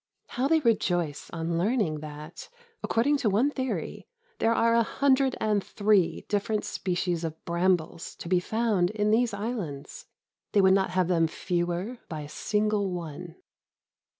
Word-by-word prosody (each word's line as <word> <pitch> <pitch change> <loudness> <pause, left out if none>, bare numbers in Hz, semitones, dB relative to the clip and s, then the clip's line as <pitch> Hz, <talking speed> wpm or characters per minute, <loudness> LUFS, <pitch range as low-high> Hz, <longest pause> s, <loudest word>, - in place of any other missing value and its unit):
How 255 +3 0
they 320 +1 +3
rejoice 175 - 0
on 165 0 -2
learning 195 -6 +1
that, 150 +2 -9 0.3
according 280 +6 +2
to 240 -6 +1
one 230 +9 +2
theory, 260 -2 -4 0.3
there 230 0 +3
are 230 0 +3
a 235 - +5
hundred 270 +2 +2
and 210 -2 +1
three 205 -4 +1
different 210 +1 -1
species 175 -2 -2
of 160 -1 -6
brambles 170 -1 0
to - - -9
be 180 +1 +3
found 210 -2 +1
in 210 0 0
these 235 +1 +3
islands! 200 - -5 0.5
They 205 - +5
would 190 0 +6
not 195 0 +2
have 185 -1 +1
them 165 -2 +3
fewer 175 +7 -2
by 155 -2 -5
a 145 - -8
single 210 +3 0
one. 170 -1 -6
190 Hz, 150 wpm, -27 LUFS, 170-225 Hz, 0.5 s, would